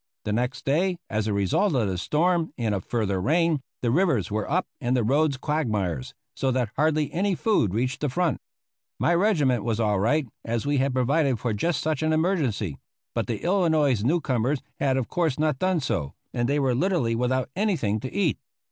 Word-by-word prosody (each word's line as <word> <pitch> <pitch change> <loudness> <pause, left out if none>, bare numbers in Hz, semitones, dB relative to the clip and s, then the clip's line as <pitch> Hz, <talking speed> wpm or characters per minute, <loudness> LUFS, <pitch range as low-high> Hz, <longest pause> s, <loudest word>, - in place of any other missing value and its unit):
The 105 - -1
next 125 +4 -2
day, 175 +6 +1
as 110 0 0
a - - 0
result 100 - +1
of 115 -5 +2
the 95 - -2
storm 165 - +1
and 115 -4 0
of 95 - -2
further 100 -5 -1
rain, 160 - +2 0.2
the 120 - +2
rivers 145 - +2
were 105 0 -2
up 180 +5 +1
and 125 -1 0
the 120 - +1
roads 140 +4 +2
quagmires, 105 - -2 0.2
so 135 - 0
that 125 -4 0
hardly 155 +1 +1
any 190 +2 +1
food 165 - +1
reached 125 +3 -1
the 150 - 0
front. 170 +2 0 0.6
My 175 - +2
regiment 155 - +2
was 115 -1 -1
all 105 -3 +2
right, 145 +9 +2 0.2
as 115 +1 -2
we 145 0 +1
had 135 0 +1
provided 135 +1 +2
for 115 -1 -1
just 165 +11 0
such 155 0 -1
an 155 0 +1
emergency; 145 - 0 0.3
but - - -1
the - - -3
Illinois 160 - +2
newcomers 135 -1 0 0.2
had 135 -1 +2
of 130 - -1
course 165 -7 0
not 150 -3 0
done 185 -2 +1
so, 80 - -2 0.2
and 120 +1 0
they 145 - +2
were 135 -3 +2
literally 155 -5 +1
without 125 +2 0
anything 170 - 0
to 130 +4 -6
eat. 190 -7 0
135 Hz, 195 wpm, -25 LUFS, 115-160 Hz, 0.6 s, of